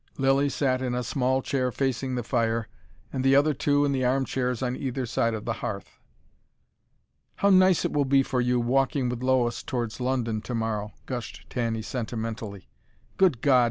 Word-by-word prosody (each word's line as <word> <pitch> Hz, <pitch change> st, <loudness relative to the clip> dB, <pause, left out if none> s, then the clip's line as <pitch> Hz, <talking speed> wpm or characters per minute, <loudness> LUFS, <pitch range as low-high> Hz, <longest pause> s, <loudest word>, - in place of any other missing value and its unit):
Lilly 135 Hz, +1 st, +3 dB
sat 130 Hz, -1 st, 0 dB
in 125 Hz, -1 st, -1 dB
a 125 Hz, -, -1 dB
small 130 Hz, +2 st, 0 dB
chair 130 Hz, -2 st, 0 dB
facing 130 Hz, +1 st, -1 dB
the 120 Hz, -, -2 dB
fire, 115 Hz, -2 st, 0 dB, 0.5 s
the 135 Hz, 0 st, +3 dB
other 145 Hz, +2 st, +4 dB
two 145 Hz, +1 st, +2 dB
in 140 Hz, -, +1 dB
the 130 Hz, -2 st, 0 dB
armchairs 125 Hz, -1 st, 0 dB
on 125 Hz, 0 st, -1 dB
either 130 Hz, -1 st, -3 dB
side 115 Hz, 0 st, 0 dB
the 120 Hz, -, -1 dB
hearth. 100 Hz, -2 st, -6 dB, 1.4 s
"How 200 Hz, -, +3 dB
nice 185 Hz, -2 st, +5 dB
it -, -, -1 dB
will 145 Hz, -1 st, +2 dB
be 135 Hz, 0 st, +4 dB
for 125 Hz, -1 st, -1 dB
you, 125 Hz, 0 st, +2 dB
walking 130 Hz, +1 st, +1 dB
with 120 Hz, 0 st, -4 dB
Lois 130 Hz, -2 st, +1 dB
towards 120 Hz, -3 st, -3 dB
London 120 Hz, -4 st, -1 dB
tomorrow," 110 Hz, -2 st, -3 dB
gushed 120 Hz, -3 st, -6 dB
Tanny 115 Hz, -3 st, -1 dB
sentimentally. 110 Hz, -, -5 dB, 0.5 s
"Good 175 Hz, -11 st, +3 dB
God!" 135 Hz, -3 st, +5 dB
125 Hz, 165 wpm, -26 LUFS, 115-135 Hz, 1.4 s, nice